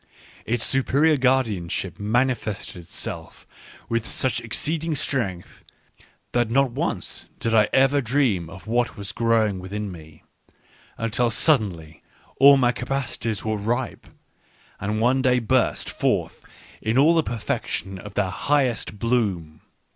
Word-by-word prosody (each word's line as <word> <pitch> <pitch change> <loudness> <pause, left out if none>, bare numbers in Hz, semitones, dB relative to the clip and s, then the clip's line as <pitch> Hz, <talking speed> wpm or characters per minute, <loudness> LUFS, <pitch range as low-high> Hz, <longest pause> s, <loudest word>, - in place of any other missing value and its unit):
Its 120 0 +1
superior 140 +4 +3
guardianship 115 - 0
manifested 110 -1 -1
itself 85 -1 -7 0.4
with 115 -1 -1
such 130 -1 0
ex 115 - -1
ceeding 160 0 -1
strength, 100 -13 -3 0.7
that 120 -2 +1
not 135 +1 +2
once - - -3
did 115 - -1
I 105 -2 +4
ever 135 +2 +4
dream 115 - +1
of 95 +2 -11
what 120 +2 0
was 100 0 -5
growing 110 -4 +1
within 100 +2 -5
me 80 -2 -13 0.4
— - - -36 0.3
until 115 +1 0
suddenly 100 - 0 0.4
all 140 +1 +9
my 125 -2 +3
capacities 125 -4 -3
were 110 0 0
ripe, 120 +5 -3 0.7
and 105 +2 -2
one 125 +4 +3
day 125 -1 +3
burst 125 +1 +1
forth - - -1 0.4
in 110 +3 0
all 150 +5 +6
the 165 - +4
perfection 100 -6 -3
of 105 0 -10
their 95 -3 0
highest 125 -2 0
bloom. 100 -9 -1
115 Hz, 130 wpm, -24 LUFS, 100-130 Hz, 0.7 s, all